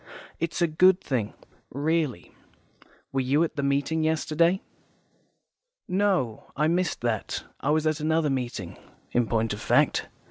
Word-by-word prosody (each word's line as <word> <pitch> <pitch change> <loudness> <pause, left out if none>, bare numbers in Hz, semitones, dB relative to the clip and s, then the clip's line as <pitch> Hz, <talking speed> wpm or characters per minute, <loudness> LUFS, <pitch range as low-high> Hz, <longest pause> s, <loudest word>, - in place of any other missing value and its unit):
It's 170 +2 -1
a - - +4
good 180 +4 +5
thing, 120 - -2 0.3
really. 145 - -1 0.8
Were 135 - 0
you 140 +5 +2
at 165 - -3
the 140 - -1
meeting 140 +3 0
yesterday?" 160 +3 +2 1.2
"No, 185 - 0
I 150 +1 +2
missed 175 +2 0
that. 115 -3 -2 0.2
I 140 - -2
was 155 +1 +2
at 155 -1 +1
another 155 -1 +1
meeting, 120 -9 -4 0.3
in 120 -1 +2
point 115 -1 0
of 105 - -7
fact. - - +2
150 Hz, 140 wpm, -26 LUFS, 125-165 Hz, 1.2 s, good